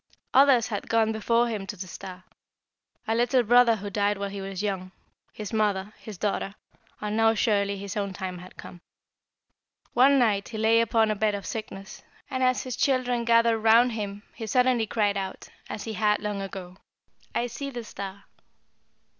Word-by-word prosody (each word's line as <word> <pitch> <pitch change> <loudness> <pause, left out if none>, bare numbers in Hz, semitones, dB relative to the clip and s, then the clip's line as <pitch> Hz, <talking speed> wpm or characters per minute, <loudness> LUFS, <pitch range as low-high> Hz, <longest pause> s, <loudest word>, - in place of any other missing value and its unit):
Others 265 -4 +5
had 205 -3 -4
gone 225 -1 +3
before 230 +2 +1
him 210 -4 -4
to 205 - -6
the 185 - -6
star. 185 +2 -9 0.8
A 225 - +1
little 245 +2 +3
brother 240 0 +5
who 205 -1 -6
died 205 0 +1
while 200 0 -4
he 200 0 -6
was 195 0 -5
young 190 -3 -3 0.4
his 215 0 -7
mother 210 -2 0
his 215 -4 -9
daughter 200 0 -2 0.4
and 210 0 -3
now 225 0 +4
surely 200 -2 +1
his 200 0 -6
own 200 -2 -2
time 185 -1 -5
had 180 +1 -13
come. 175 - -11 1.1
"One 270 +3 +5
night 210 -6 +2
he 225 - -6
lay 225 +1 +4
upon 225 -1 +2
a - - 0
bed 210 0 +1
of 200 - -6
sickness, 210 -3 -7 0.3
and 260 -1 -2
as 255 0 +2
his 255 -3 -4
children 250 -3 +1
gathered 230 -1 +4
around 230 +3 +5
him 205 -2 -5
he 225 - -7
suddenly 250 0 +2
cried 205 -2 +1
out, 190 -1 -5 0.2
as 210 - -5
he 225 - -5
had 210 +1 +2
long 205 -1 -3
ago, 185 -1 -7 0.6
'I 240 - +1
see 245 +4 -5
the 240 -3 -6
star.' 200 -2 -8
215 Hz, 180 wpm, -26 LUFS, 200-230 Hz, 1.1 s, Others